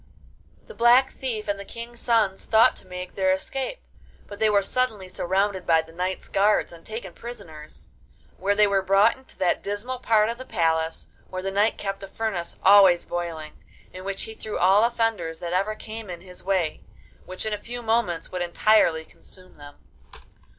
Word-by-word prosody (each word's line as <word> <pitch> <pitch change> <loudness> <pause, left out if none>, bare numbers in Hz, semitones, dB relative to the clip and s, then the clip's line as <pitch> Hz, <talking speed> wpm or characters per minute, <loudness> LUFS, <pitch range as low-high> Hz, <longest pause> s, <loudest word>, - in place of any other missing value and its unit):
The - - -11
Black 240 +3 +5
Thief 230 -6 -4
and 200 -1 -1
the - - -6
King's 235 +3 -9
sons 220 -6 +1
thought 220 0 +5
to - - -15
make 180 0 -7
their 190 -1 +2
escape, 265 - -3 0.4
but 205 - -10
they 220 - +3
were 200 -1 +3
suddenly 220 -4 -1
surrounded 190 +1 -1
by 165 -1 +4
the 160 - -16
knight's 180 +3 -3
guards 205 -2 +2
and 165 -1 -14
taken 215 -5 -7
prisoners; 160 -10 -11 0.5
where 200 +2 +1
they 210 0 +5
were 200 -1 +2
brought 195 +4 +4
into 265 0 -20
that 180 -2 +1
dismal 220 +6 -4
part 220 -3 +3
of 235 +2 -4
the - - -6
palace 165 -7 -1 0.2
where 185 0 -5
the 195 - -2
knight 205 +3 +2
kept 195 0 -4
a 195 - -7
furnace 195 -4 -4
always 190 -3 +7
boiling, 165 -3 -5 0.4
in 185 - -8
which 195 0 -3
he 220 - -6
threw 215 -1 -6
all 190 +4 +5
offenders 225 -9 0
that 175 0 -4
ever 200 +4 0
came 220 -1 -8
in 175 -1 -7
his 180 -1 -14
way, 185 -5 0 0.5
which 185 +3 -7
in 215 - -1
a - - -1
few 240 +2 -7
moments 220 -7 0
would 180 - -3
entirely 175 -2 +3
consume 185 +2 -19
them. 145 0 -12
195 Hz, 185 wpm, -25 LUFS, 180-220 Hz, 0.5 s, always